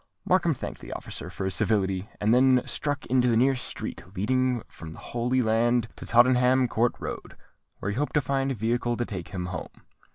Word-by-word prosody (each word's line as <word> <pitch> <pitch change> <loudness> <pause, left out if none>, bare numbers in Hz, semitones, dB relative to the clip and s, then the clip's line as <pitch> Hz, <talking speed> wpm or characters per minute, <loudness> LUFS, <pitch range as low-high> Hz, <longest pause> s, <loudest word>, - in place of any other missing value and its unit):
Markham - - +2
thanked - - -7
the - - -7
officer - - -6
for 95 - -5
his 95 - -1
civility, 95 -2 0
and 105 +2 +3
then 130 0 +5
struck 145 0 -2
into 125 0 +2
the 115 -2 +3
nearest 130 +1 +2
street - - -6
leading 125 +4 +1
from 80 -1 -10
the - - -13
Holy 125 +2 -1
Land 115 +1 +2
to - - -9
Tottenham 125 +2 +4
Court 115 +1 +1
Road, - - -6 0.4
where 100 - -3
he 105 - -4
hoped 145 +3 -1
to 150 - +4
find 135 0 0
a 135 - -1
vehicle 120 +2 0
to 120 - -1
take 90 -7 -6
him 90 -2 -5
home. 95 +1 -7
120 Hz, 200 wpm, -26 LUFS, 105-130 Hz, 0.4 s, then